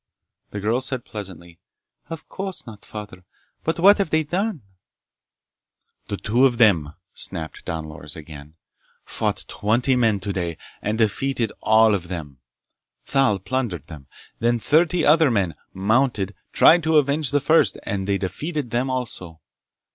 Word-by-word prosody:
The 105 - -5
girl 110 +5 0
said 130 -2 -3
pleasantly: 90 -5 -9 0.5
"Of 165 -1 -7
course 190 -1 -6
not, 110 -3 -11
Father. 105 -4 -9 0.4
But 160 - -1
what 200 +4 +6
have 195 - +1
they 160 0 +2
done?" 180 - -2 1.4
"The 100 - -3
two 120 +6 +1
of 120 -2 -3
them," 85 -11 +3 0.2
snapped 80 -1 -5
Don 80 -1 -4
Loris 75 -1 -6
again, 75 -1 -11 0.5
"fought - - -2
twenty 120 +5 +1
men 115 -5 +2
today 90 -4 -3 0.2
and 105 +1 -1
defeated 115 +1 0
all 110 0 +5
of 90 -4 -2
them! 75 -7 -7 0.7
Thal 135 -7 +2
plundered 100 - -3
them. 75 -5 -11 0.3
Then 120 +1 +2
thirty 160 +7 +2
other 160 -1 +5
men, 100 -8 0 0.2
mounted, 105 0 +1 0.2
tried 170 +1 +6
to 160 0 +3
avenge 145 0 +2
the 145 - +2
first 155 +4 +3
and 100 -2 -3
they 100 -1 +1
defeated 135 - -4
them 125 +3 0
also! 105 -10 -5
110 Hz, 145 wpm, -23 LUFS, 95-135 Hz, 1.4 s, what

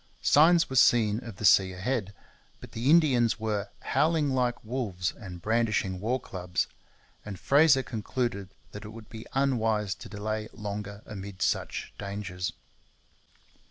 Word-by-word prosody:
Signs 165 +3 +5
were 130 - -6
seen 110 -3 +4
of 115 -4 -8
the 105 - -4
sea 95 -2 +5
ahead; 100 +1 -2 0.4
but - - -12
the 120 +4 -1
Indians 130 -9 +4
were 105 -2 -2
'howling 155 -2 +1
like 125 -3 -1
wolves 105 -8 -2
and 90 -5 -10
brandishing 110 -4 0
war 120 +6 0
clubs,' 90 -5 -3 0.6
and 100 -3 -7
Fraser 140 -1 +5
concluded 110 -3 -3 0.2
that 105 - -8
it 105 - -8
would 110 0 -11
be 110 0 -9
unwise 115 -7 +1
to 115 - -11
delay 110 +1 -4
longer 105 -1 -6
amid 100 -2 -6
such - - -2
dangers. 100 -3 -4
110 Hz, 140 wpm, -28 LUFS, 100-125 Hz, 0.6 s, Signs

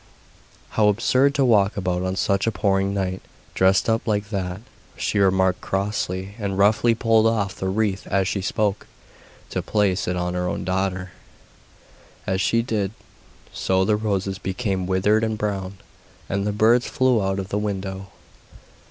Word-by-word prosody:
'How 105 -1 +2
absurd 130 +6 +3
to 140 - +3
walk 105 -5 +3
about 90 -2 -1
on 95 0 -2
such 100 +2 0
a - - +3
pouring 95 0 +1
night, 95 -2 -2 0.3
dressed 95 +1 +3
up 115 0 0
like 105 0 -1
that,' 95 -1 -3 0.4
she 105 - -1
remarked 95 -1 +2
crossly, 95 -1 -2
and 100 -2 -2
roughly 110 +3 +4
pulled 115 -1 +3
off 105 -4 0
the 95 - -4
wreath 100 -1 -1
as 95 -1 +1
she 95 +1 -1
spoke, 105 +1 -1 0.6
to - - -1
place 100 -3 0
it 90 - 0
on 90 0 -2
her 90 0 -1
own - - -3
daughter. 95 0 -2 1.1
As 95 0 0
she 115 +3 +2
did 105 -4 -2 0.6
so 95 0 +1
the 105 - +3
roses 100 -2 -2
became 95 -2 -2
withered 105 +4 +2
and 110 -1 -1
brown, 100 -2 -3 0.5
and 100 +1 -1
the - - +1
birds 115 +4 +3
flew 130 -4 +2
out 95 0 -1
of 95 0 -4
the 105 - -1
window. 95 -2 -4
100 Hz, 160 wpm, -23 LUFS, 95-105 Hz, 1.1 s, roughly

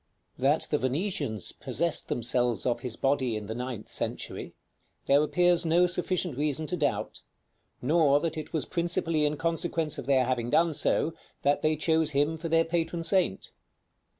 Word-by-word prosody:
§ - - -46
II. - - -25
That 145 +4 +2
the 150 - +2
Venetians 135 - -1
possessed 170 0 -1
themselves 120 -2 +1
of 120 -1 +1
his 120 -2 -4
body 135 -4 0
in 105 - -6
the 110 - -4
ninth 125 -2 -5
century, - - -5 0.5
there 140 +1 +4
appears 175 +2 +3
no 170 +2 +4
sufficient 180 -4 -1
reason 150 +1 0
to 180 - -2
doubt, 145 -5 -2 0.6
nor 145 0 +4
that 165 +1 -2
it 155 - -6
was 160 - -1
principally 170 -3 0
in 150 0 0
consequence 165 -2 -2
of - - -7
their 130 -2 +3
having 120 -2 -1
done 165 +4 +3
so, 155 +2 +1 0.3
that 145 +1 +2
they 155 0 +2
chose 160 0 +1
him 145 +3 +2
for 165 +1 -5
their 165 0 +3
patron 165 0 -2
saint. 180 - +1
150 Hz, 175 wpm, -28 LUFS, 130-165 Hz, 0.6 s, there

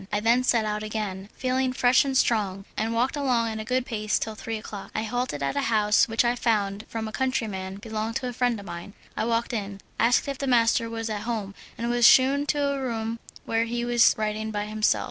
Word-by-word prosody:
I 205 - +1
then 235 +4 +3
set 235 -3 +2
out 210 0 -2
again, 210 -2 -4
feeling 255 0 0
fresh 250 0 +4
and 270 -2 0
strong, 200 -6 +1
and 225 +1 -1
walked 240 +5 +1
along 250 -5 +1
at 220 0 -4
a - - -3
good 250 +3 0
pace 215 -3 -1
till 220 - -3
three 225 +1 -5
o'clock. 210 -2 -8
I 220 - 0
halted 225 - -2
at 140 - -1
a 285 - +1
house 210 -2 +4
which 225 +1 +1
I 240 +1 +2
found 210 -3 0
from 225 -1 -4
a - - -6
countryman 210 -7 -2
belonged 220 +1 -4
to 265 -1 -2
a 245 - -4
friend 245 -2 0
of 200 - -10
mine. 170 +3 -8 0.2
I - - -1
walked 230 +1 0
in, 200 -3 -4 0.2
asked 240 +4 +3
if 275 -1 -4
the 275 - -2
master 230 -2 +3
was 225 0 -4
at 210 -1 -3
home, 210 -3 -3 0.2
and 235 - -2
was 240 -1 +5
shewn 265 +2 +6
into 290 +1 -1
a 280 -1 -1
room 230 -2 -3 0.3
where 225 0 +1
he 240 +1 -2
was 240 -1 +5
writing 215 0 -2
by 210 -1 -2
himself. 215 0 +1
225 Hz, 230 wpm, -26 LUFS, 215-245 Hz, 0.3 s, shewn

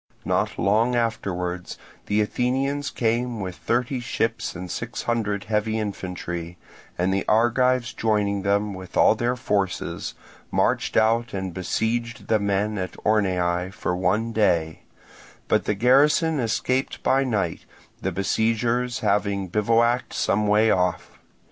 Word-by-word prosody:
Not - - 0
long 115 +5 +2
afterwards 90 -6 -2 0.3
the 105 +1 +2
Athenians 135 +6 -1
came 120 0 -1
with 95 -2 -4
thirty 125 +5 -1
ships 115 -1 -2
and 90 -1 -6
six 120 0 -4
hundred 105 -4 -1
heavy 110 +1 0
infantry, 90 -4 -5 0.4
and 90 +2 +1
the 95 - 0
Argives 120 +2 +2
joining 105 -2 0
them 100 +1 0
with 95 -1 -8
all - - +6
their 120 +3 -1
forces, 100 -7 -2 0.3
marched - - +1
out 115 +1 +2
and 95 -2 -3
besieged 115 +6 -2
the 110 - +3
men 100 +1 0
in 95 -1 -2 0.2
Orneae 90 -4 +1
for 95 -3 -2
one 100 +6 0
day; 85 -7 +1 0.6
but - - +2
the 105 - 0
garrison 145 - +4
escaped 125 +3 -1
by 135 +1 +3
night, 105 -10 -2 0.4
the - - -1
besiegers 115 +4 0
having 100 -2 0
bivouacked 115 +5 +2
some 105 +1 +1
way 105 +2 +4
off. 90 0 0
105 Hz, 130 wpm, -24 LUFS, 95-120 Hz, 0.6 s, all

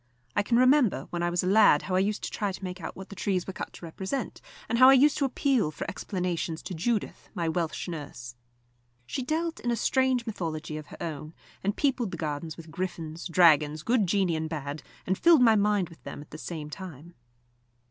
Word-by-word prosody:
I - - +4
can 235 +3 +1
remember 255 - +4
when 175 - -2
I 175 - +1
was 175 +1 0
a - - -1
lad 200 -6 +6
how 185 - -4
I 185 - +4
used 205 +2 0
to - - -3
try 205 -2 -1
to 190 - -9
make 180 0 -5
out - - -6
what 190 +1 -9
the 200 - -9
trees 185 -2 -1
were 190 - -6
cut - - -6
to - - -10
represent, 190 +10 -4 0.3
and 235 - 0
how 255 +1 +9
I - - +9
used 280 +2 +5
to 280 - +2
appeal 265 - +1
for 155 - -6
explanations 175 -3 -3
to - - -5
Judith, 210 +6 -2
my 170 -1 -1
Welsh 165 +1 -2
nurse. 145 -7 -7 0.7
She 265 - -3
dealt 325 +5 -2
in 240 - -2
a 235 - +2
strange 260 0 +1
mythology 160 -8 -4
of 155 -1 -8
her - - -11
own, 155 -1 -6 0.3
and 200 +1 -1
peopled 265 -6 +1
the - - -6
gardens 155 +1 -4
with 165 -1 -11
griffins, 165 -2 -4
dragons, 155 -3 +4
good 230 -5 +2
genii 185 -2 +2
and 160 0 -2
bad, 145 -1 -4 0.2
and 190 +1 0
filled 335 -6 +6
my 225 -2 +6
mind 205 -3 +2
with 165 - -16
them - - -7
at 145 - -15
the 155 - -8
same 150 +2 -6
time. 170 -2 -9
185 Hz, 220 wpm, -28 LUFS, 160-225 Hz, 0.7 s, how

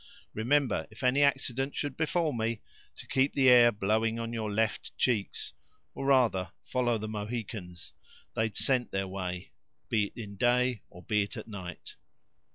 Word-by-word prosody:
Remember, 120 - +1
if 110 +4 -12
any 130 +3 +3
accident 135 -1 +1
should 145 -3 -2
befall 160 0 0
me, 115 -1 -2 0.3
to - - -10
keep 135 +1 +1
the 135 -2 +5
air 120 -1 +8
blowing 110 +2 +1
on 115 0 -4
your 110 -2 -2
left 110 +2 -1
cheeks—or, 100 - -3
rather, 115 -10 +3
follow 120 -2 0
the 110 0 -5
Mohicans; 105 -5 -5 0.4
they'd 110 -1 -1
scent 130 -3 +2
their 95 0 -2
way, 90 -1 -5 0.4
be 110 -2 +2
it - - -10
in 100 -3 -7
day 125 0 +2
or 90 - -13
be 105 -2 +2
it 100 - -4
at - - -7
night." 95 -5 -8
115 Hz, 160 wpm, -30 LUFS, 100-125 Hz, 0.4 s, air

